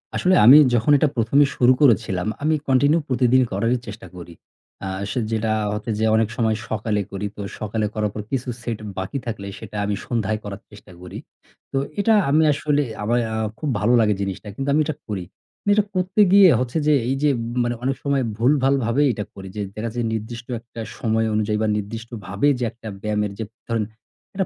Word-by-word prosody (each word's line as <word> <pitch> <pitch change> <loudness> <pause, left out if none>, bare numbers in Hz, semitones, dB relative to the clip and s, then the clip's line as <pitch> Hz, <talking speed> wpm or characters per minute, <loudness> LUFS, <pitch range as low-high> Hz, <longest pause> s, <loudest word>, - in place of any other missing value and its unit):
আসলে 185 +1 +3
আমি 130 +6 +10 0.2
যখন 120 +5 +2
এটা 155 - +3
১ম 115 +3 +1
এ - - +4
শুরু 125 +1 +5
করেছিলাম 100 -7 +3 0.2
আমি 155 0 +3
continue 145 +5 +3
প্রতিদিন 130 0 +3
করারই 115 +6 +1
চেষ্টা 105 +2 -8
করি। 85 -1 -10 0.5
আ - - -3 0.2
সে - - -1
যেটা 110 0 0 0.2
হচ্ছে 105 +2 -4
যে 110 - +2
অনেক 110 -1 +2
সময় 110 -2 +2
সকালে 105 -1 -1
করি, 100 +1 -4
তো - - -7 0.2
সকালে 110 +1 -2
করার 105 -1 -1
পর 105 - -4
কিছু 130 -1 -2
set 115 -2 -3 0.2
বাকি 95 +8 -3
থাকলে 110 -4 -5
সেটা 105 -1 -8
আমি 105 0 -1
সন্ধ্যায় 110 -3 -1
করার 100 -1 -7
চেষ্টা 100 -2 -15
করি। 90 - -8 0.5
তো - - -1 0.2
এটা 220 +3 +3 0.2
আমি 155 +3 +4
আসলে 145 0 0 0.2
আমার 115 +1 0 0.3
খুব 155 - -2
ভালো 120 +4 +2
লাগে 105 -2 +3
জিনিসটা 100 +1 -4
কিন্তু 135 +1 -3
আমি 155 - +4
এটা 155 -1 -3
করি। 100 -4 -3 0.4
কিন্তু 205 - +1
এটা 210 - +3
করতে 185 +3 +1
গিয়ে 195 -2 +8
হচ্ছে 125 +3 -2
যে, 150 - +5 0.2
এই 135 - +1
যে 150 - +5 0.3
মানে 120 0 -1
অনেক 135 +1 0
সময় 140 -2 +1
ভুলভাল 135 +3 +3
ভাবেই 135 +6 +2
এটা 105 -1 -4
করি। 95 -1 -9
যে 105 - -3
দেখা 115 +2 -3
যে 120 - -1
নির্দিষ্ট 115 +2 -5
একটা 115 0 -10 0.2
সময় 110 -1 +1
অনুযায়ী 105 0 0
বা - - +1
নির্দিষ্টভাবে 105 +1 -3
যে - - -1
একটা 115 -1 -12
ব্যায়ামের 105 -1 -1
যে 110 - -1 0.3
ধরেন 115 -2 0 0.5
একটা 190 -1 -1
115 Hz, 195 wpm, -22 LUFS, 105-135 Hz, 0.5 s, আমি